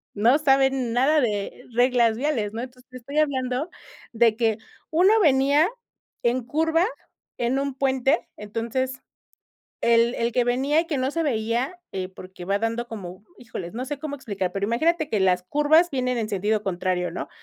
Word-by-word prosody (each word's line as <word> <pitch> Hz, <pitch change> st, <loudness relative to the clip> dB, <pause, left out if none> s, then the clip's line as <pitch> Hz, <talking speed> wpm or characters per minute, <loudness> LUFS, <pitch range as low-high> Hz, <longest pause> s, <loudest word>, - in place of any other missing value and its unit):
no 235 Hz, +7 st, +4 dB
saben 270 Hz, -4 st, +2 dB
nada 280 Hz, +5 st, +3 dB
de 210 Hz, -1 st, -2 dB
reglas 240 Hz, -2 st, +3 dB
viales, 240 Hz, -7 st, -1 dB
¿no? 230 Hz, -, -4 dB
Entonces, 250 Hz, 0 st, -11 dB
te 255 Hz, -, -9 dB
estoy 275 Hz, +4 st, -7 dB
hablando 265 Hz, 0 st, 0 dB, 0.4 s
de 230 Hz, -1 st, +3 dB
que 225 Hz, -3 st, +1 dB, 0.3 s
uno 360 Hz, +6 st, +5 dB
venía 285 Hz, 0 st, +4 dB, 0.6 s
en 240 Hz, +2 st, +2 dB
curva, 320 Hz, +6 st, +1 dB, 0.5 s
en 245 Hz, +3 st, 0 dB
un 280 Hz, 0 st, -2 dB
puente, 270 Hz, +2 st, +1 dB
entonces, 235 Hz, +5 st, -3 dB, 0.8 s
el 235 Hz, +1 st, +4 dB
el 235 Hz, +1 st, -1 dB
que 245 Hz, 0 st, +2 dB
venía 270 Hz, +6 st, +2 dB
y 335 Hz, -, -5 dB
que 315 Hz, -, -2 dB
no 260 Hz, 0 st, 0 dB
se 330 Hz, +3 st, -1 dB
veía, 245 Hz, +4 st, -1 dB
eh, 185 Hz, -1 st, -3 dB
porque 185 Hz, -1 st, -11 dB
va 200 Hz, +1 st, +1 dB
dando 230 Hz, +2 st, -2 dB
como 195 Hz, -3 st, -8 dB
híjoles, 215 Hz, -5 st, -7 dB
no 250 Hz, -, -3 dB
sé 285 Hz, +1 st, -5 dB
cómo 285 Hz, -1 st, -5 dB
explicar, 200 Hz, -8 st, -3 dB
pero 195 Hz, +1 st, -2 dB
imagínate 315 Hz, +8 st, +1 dB
que 215 Hz, -, +1 dB
las 180 Hz, -1 st, +3 dB
curvas 295 Hz, -, +3 dB
vienen 255 Hz, -2 st, -1 dB
en 225 Hz, -2 st, -2 dB
sentido 210 Hz, +2 st, 0 dB
contrario, 180 Hz, -1 st, -1 dB
¿no? -, -, -5 dB
245 Hz, 170 wpm, -24 LUFS, 220-280 Hz, 0.8 s, uno